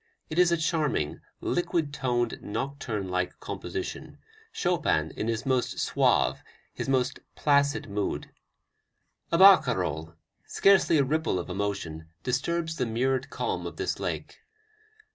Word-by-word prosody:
It 160 - 0
is 180 -1 +5
a 170 - +3
charming, 155 - 0 0.2
liquid 165 -4 0
toned, 120 -4 -1
nocturne 115 -4 -3
like 90 0 -2
composition, - - -6 0.3
Chopin 80 +1 0
in 110 - -4
his 115 +2 -2
most 130 -2 0
suave, - - +2 0.3
his - - -4
most 130 -2 +1 0.2
placid 140 -1 +2
mood: 100 0 -3 1.0
a 170 - +3
barcarolle, 95 - +5 0.3
scarcely 195 -4 +4
a 140 - +4
ripple 155 -5 0
of 90 +1 -4
emotion, 90 -5 -3 0.2
disturbs 160 +6 -1
the 125 - 0
mirrored 130 +4 0
calm - - -2
of - - -9
this - - -2
lake. - - -4
130 Hz, 125 wpm, -28 LUFS, 100-155 Hz, 1.0 s, is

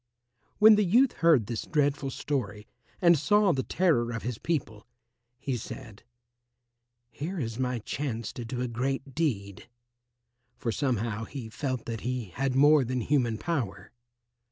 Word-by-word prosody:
When 215 0 +8
the 210 - +4
youth 235 +8 +4
heard 160 -10 +4
this 115 +1 -3
dreadful 145 -2 +1
story 110 -7 -3 0.4
and 170 -3 +6
saw 205 +4 +4
the 135 - 0
terror 130 -9 +1
of 115 - -5
his 120 -2 -4
people, 120 -10 -3 0.5
he 135 0 -3
said, 110 -2 -8 1.1
"Here 165 +11 -5
is 115 -3 -4
my 125 -1 0
chance 115 0 -4
to 120 - -6
do 125 +2 -4
a 125 - -1
great 135 +3 -3
deed," 115 - -2 0.9
for 115 - -2
somehow 115 -3 -1
he 125 -4 -7
felt 130 0 -3
that 115 -2 -5
he 125 -4 -3
had 135 +3 -1
more 145 +1 +6
than 125 +1 -2
human 120 -3 +1
power. 130 - -3
130 Hz, 150 wpm, -28 LUFS, 115-150 Hz, 1.1 s, When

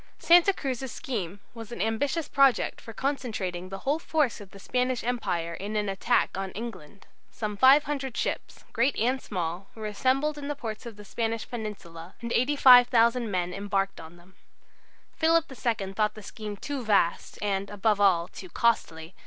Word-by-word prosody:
Santa 350 +3 +6
Cruz's 265 -7 -4
scheme 200 -8 -5
was 225 -2 -9
an 235 - -7
ambitious 265 - -1
project 275 -2 +3
for 225 - -9
concentrating 210 -9 -3
the 195 - -5
whole 290 +4 +1
force 300 -9 0
of 200 - -11
the 195 - -14
Spanish 250 +4 -1
Empire 175 -9 -2
in 205 +5 -5
an 210 -1 0
attack 195 +5 +1
on 195 0 -3
England. 200 -5 -8 0.2
Some 210 -2 -4
500 270 +1 +4
ships, - - -3
great 245 +4 +1
and 255 +4 +1
small, 180 0 -4
were 220 - -8
to - - -2
be - - -6
assembled 270 +7 +1
in 280 - -6
the 290 - -2
ports 230 -3 -6
of 230 - -8
the 210 0 -12
Spanish 225 +1 -3
peninsula, 190 -7 -7
and 235 -1 -4
85,000 245 -3 +5
men 180 -2 -1
embarked 195 0 -2
on 160 +1 -12
them. 175 +2 -20 0.8
Philip 330 0 +3
II 220 -6 -2
thought 210 +1 0
the 215 - -10
scheme 210 0 -7
too 280 +3 -4
vast, 200 -6 +1
and, 200 -1 -1
above 205 0 +1
all, 175 -4 +4
too 185 0 -11
costly. 165 -8 0
220 Hz, 175 wpm, -27 LUFS, 195-255 Hz, 0.8 s, Santa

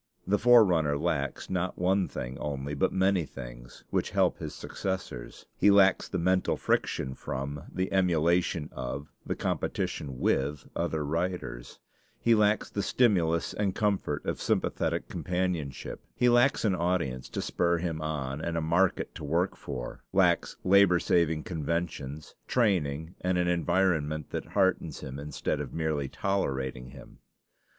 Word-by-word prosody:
The 100 +2 +2
forerunner 90 -12 +5
lacks 70 -4 -2
not 90 0 -2
one 95 +1 +2
thing 65 -3 -5
only, 70 -1 -3
but 70 - +1
many 95 -1 +2
things, - - -10
which - - 0
help - - +2
his - - -6
successors. 90 -11 -5
He 105 - +6
lacks 100 -1 +5
the - - -2
mental 90 +2 +1
friction 65 - 0
from, 70 +4 -5
the 95 +1 -2
emulation 85 -2 +2
of, 70 +4 -5 0.2
the - - -1
competition 70 -4 -2
with, 70 +2 0
other 80 -3 -1
writers; 85 -6 -3 0.4
he 115 - +4
lacks 105 -1 +3
the 100 - -1
stimulus 90 -8 +2
and 100 -3 -1
comfort 100 -8 0
of - - -2
sympathetic - - 0
companionship; 90 -6 -3
he 125 - +3
lacks 120 +1 +4
an 100 - +3
audience 85 -8 -1
to - - -4
spur 85 0 +1
him 80 -2 -3
on, 75 -2 -3
and 85 +1 -2
a - - +2
market 85 +4 +1
to - - -9
work 85 +6 0
for; 60 -2 -7
lacks - - +2
labor 95 -1 +6
saving 80 -3 +2
conventions, 80 -3 -3
training, 85 - +1
and 90 0 +1
an 90 0 +1
environment 85 -3 +1
that - - -3
heartens - - +1
him 70 +1 -6
instead 75 0 -2
of - - -7
merely 80 -3 -1
tolerating 65 -10 -2
him. 65 -1 -14
85 Hz, 145 wpm, -29 LUFS, 70-95 Hz, 0.4 s, He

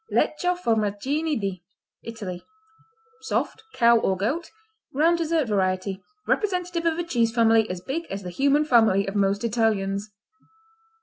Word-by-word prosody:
Lecco, 360 +4 +1
Formaggini 255 - 0
di 195 -3 -4 0.4
Italy 205 -6 -7 0.8
Soft; 440 - -2
cow 235 0 +5
or 190 -3 0
goat; 280 - -2 0.5
round 335 +4 +3
dessert 325 -4 0
variety; 190 -1 -1 0.3
representative 360 -4 0
of 325 -1 +1
a 345 - -1
cheese 235 -9 +1
family 225 -1 +3
as 180 -1 -5
big 315 - -4
as 195 0 -5
the 180 - -6
human 280 +9 +2
family 225 -7 +4
of 195 - -3
most 200 +1 +1
Italians. 210 -3 0
230 Hz, 135 wpm, -24 LUFS, 200-310 Hz, 0.8 s, cow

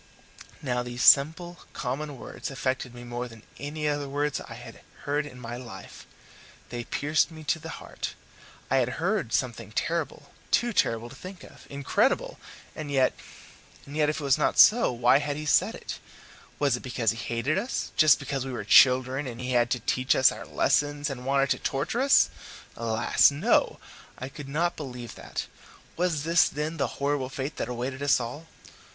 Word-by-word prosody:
Now 125 -3 0
these 120 0 -4
simple, 160 +5 +5
common 140 +3 -4
words - - -7
affected 130 -2 -3
me 120 - -9
more 120 +1 -4
than 115 -2 -14 0.2
any 150 +1 -3
other 145 -1 -1
words 145 +1 -1
I - - -9
have - - -11 0.3
heard 145 +1 -1
in 125 -3 -12
my 120 0 -6
life. 125 -2 -10 0.6
They 120 -1 -5
pierced 150 +3 +1
me 160 -1 -11
to 165 +2 0
the 160 +1 -8
heart. - - -6 0.6
I 135 - +4
had 125 -1 0
heard 175 - -1
something 115 -3 -2
terrible 155 +2 -3 0.2
too 240 -1 +2
terrible 115 - +1
to - - -11
think 185 +3 -10
of, - - -15
incredible 140 -1 0 0.4
and 155 -2 -6
yet 135 -2 +3 0.7
and 140 - -10
yet 150 -1 +2
if 155 - -2
it - - -6
was 135 -2 +3
not - - +1
so, 235 - +7
why 120 +3 +4
had 145 -1 -3
he 155 - -5
said 150 - +3
it? - - -7 0.6
Was 140 -4 +2
it - - -5
because 120 -4 0
he 115 - -7
hated 120 +8 -1
us, 240 +6 -3
just 155 -1 +6
because 135 -2 -3
we 135 - -5
were 120 - -4
children 130 +5 +5
and 120 -2 -7
he 125 0 -3
had 120 -1 +3
to 125 - 0
teach 130 +2 +1
us 130 - +6
our - - -8
lessons, 145 0 +1
and 125 -1 -7
wanted 135 0 +2
to - - +1
torture 150 - -1
us? 275 +1 +5 0.4
Alas! 115 0 +3
no, 145 +1 +2 0.4
I 130 - -6
could 140 0 -9
not 170 +5 0
believe 125 -5 -7
that! - - -6 0.5
Was 170 -4 0
this, 165 +2 +4
then, 150 +2 -4
the 140 - +1
horrible 140 -2 -1
fate 135 +2 -5
that - - -3
awaited 125 +3 -4
us 145 -2 +3
all? 125 +7 -6
140 Hz, 185 wpm, -27 LUFS, 125-150 Hz, 0.7 s, so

